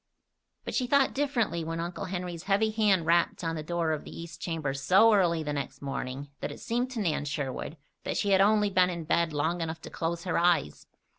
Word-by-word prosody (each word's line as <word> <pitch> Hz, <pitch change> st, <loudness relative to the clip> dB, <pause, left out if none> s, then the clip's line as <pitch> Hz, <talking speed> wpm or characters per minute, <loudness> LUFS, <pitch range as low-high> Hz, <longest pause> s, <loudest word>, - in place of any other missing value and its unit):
But -, -, -4 dB
she 250 Hz, -, 0 dB
thought 280 Hz, +1 st, +3 dB
differently 240 Hz, -, 0 dB
when 165 Hz, +1 st, -4 dB
Uncle 170 Hz, +1 st, -4 dB
Henry's 180 Hz, -2 st, -5 dB
heavy 205 Hz, +2 st, +2 dB
hand 205 Hz, -6 st, +2 dB
rapped 170 Hz, +1 st, +2 dB
on 165 Hz, -1 st, -1 dB
the 155 Hz, -, -3 dB
door 165 Hz, +1 st, -1 dB
of 155 Hz, -, -2 dB
the -, -, -9 dB
east 165 Hz, 0 st, -9 dB
chamber 160 Hz, -5 st, -2 dB
so 185 Hz, +11 st, +5 dB
early 170 Hz, -5 st, +3 dB
the 150 Hz, -1 st, -3 dB
next 135 Hz, -2 st, -4 dB
morning 140 Hz, 0 st, -5 dB
that -, -, -4 dB
it -, -, -9 dB
seemed 245 Hz, +2 st, -1 dB
to 235 Hz, -, -3 dB
Nan 165 Hz, -8 st, 0 dB
Sherwood 145 Hz, +2 st, -4 dB, 0.3 s
that -, -, -2 dB
she 205 Hz, -, +1 dB
had 190 Hz, 0 st, +5 dB
only 210 Hz, 0 st, +4 dB
been 185 Hz, -1 st, +4 dB
in 170 Hz, -2 st, -4 dB
bed 170 Hz, +1 st, +1 dB
long 160 Hz, +4 st, -1 dB
enough 165 Hz, 0 st, -3 dB
to -, -, -9 dB
close 170 Hz, +1 st, -3 dB
her 180 Hz, -, 0 dB
eyes. 170 Hz, -, +1 dB
170 Hz, 220 wpm, -28 LUFS, 155-195 Hz, 0.3 s, so